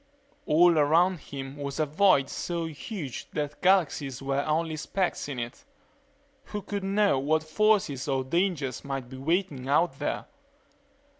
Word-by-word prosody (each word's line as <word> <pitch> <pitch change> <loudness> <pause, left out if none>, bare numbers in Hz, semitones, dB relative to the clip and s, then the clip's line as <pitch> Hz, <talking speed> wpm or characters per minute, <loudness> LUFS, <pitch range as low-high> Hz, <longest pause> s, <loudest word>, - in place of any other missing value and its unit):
All 165 +1 +5
around 165 +5 +3
him 135 -1 -8
was 140 +1 -5
a 155 - +3
void 155 -3 +4
so 170 +2 -3
huge 160 - -6
that 150 -1 -3
galaxies 155 -8 +2
were 135 +1 -1
only 160 +1 0
specks 175 0 -2
in 135 - -4
it.... 120 - -6 0.8
Who 210 -1 -5
could 200 0 -4
know 195 -6 +2
what 155 +3 +1
forces 155 -5 +1
or 135 -2 0
dangers 155 -3 -1
might 135 -3 -4
be 130 - -9
waiting 145 -2 -1
out 145 -1 +2
there? 145 - -2
155 Hz, 145 wpm, -27 LUFS, 135-180 Hz, 0.8 s, All